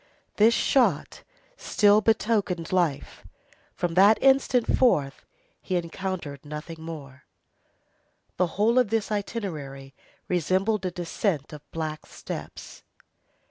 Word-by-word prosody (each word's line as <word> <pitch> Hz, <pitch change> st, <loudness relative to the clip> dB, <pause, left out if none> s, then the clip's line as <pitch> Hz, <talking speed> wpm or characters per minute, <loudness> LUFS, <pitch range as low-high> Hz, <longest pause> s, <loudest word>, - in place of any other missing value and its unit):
This 225 Hz, +2 st, +5 dB
shot 215 Hz, -, +1 dB, 0.4 s
still 205 Hz, 0 st, +3 dB
betokened 210 Hz, -6 st, 0 dB
life. 175 Hz, -7 st, -1 dB, 0.5 s
From 175 Hz, -1 st, -2 dB
that 200 Hz, +5 st, +6 dB
instant 265 Hz, -3 st, +3 dB
forth 145 Hz, -, +1 dB, 0.3 s
he 185 Hz, -, -3 dB
encountered 170 Hz, -4 st, -4 dB
nothing 150 Hz, +2 st, -7 dB
more. 140 Hz, -5 st, -9 dB, 1.1 s
The 180 Hz, -, +2 dB
whole 230 Hz, +4 st, +4 dB
of 245 Hz, -5 st, +2 dB
this 220 Hz, -1 st, -1 dB
itinerary 155 Hz, -, -5 dB, 0.3 s
resembled 185 Hz, +4 st, 0 dB
a -, -, -1 dB
descent 175 Hz, -3 st, -3 dB
of 150 Hz, -, -9 dB
black 155 Hz, -1 st, -5 dB
steps. -, -, -8 dB
180 Hz, 105 wpm, -26 LUFS, 155-215 Hz, 1.1 s, that